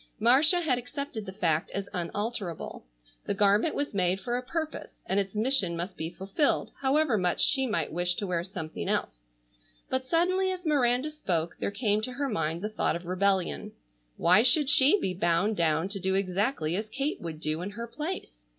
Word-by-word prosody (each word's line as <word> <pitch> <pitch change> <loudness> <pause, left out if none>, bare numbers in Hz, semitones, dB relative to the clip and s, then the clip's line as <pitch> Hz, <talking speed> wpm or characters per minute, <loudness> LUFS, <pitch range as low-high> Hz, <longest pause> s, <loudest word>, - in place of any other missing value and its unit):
Marcia 280 - +5
had 265 -7 +1
accepted 245 -4 -6
the - - -5
fact 165 -4 0
as 200 0 -3
unalterable. 185 - -4 0.4
The - - 0
garment 205 +8 +3
was 285 -3 -2
made 185 -1 +1
for 240 +5 -3
a 250 - -1
purpose, 315 +4 -5
and 195 - +1
its 195 0 -3
mission 215 -6 +2
must 180 +3 -4
be 160 +1 -3
fulfilled 195 - 0
however 270 -4 +2
much 180 -1 0
she 265 -2 +4
might 165 - -1
wish 175 +1 +1
to 205 - -3
wear 175 -3 -1
something 160 - -5
else, - - -2 0.7
but 260 0 -1
suddenly 370 +4 +2
as 365 -1 -6
Miranda 270 -1 +2
spoke 175 - -2
there - - -1
came 210 0 0
to 250 +3 -4
her 280 +2 -2
mind 165 -4 -2
the 210 - -1
thought 215 - 0
of 170 +1 -6
rebellion. 185 +1 0 0.4
Why 180 +5 +5
should 265 +4 +4
she 285 +7 +6
be 185 - -1
bound 175 +4 +1
down 165 0 +1
to 200 0 -2
do 190 +1 0
exactly 190 - 0
as 210 +3 -3
Kate 275 +7 -3
would 165 -3 -6
do 155 +1 -2
in 185 - -4
her 230 +3 -6
place? 295 - -6
205 Hz, 190 wpm, -28 LUFS, 175-265 Hz, 0.7 s, she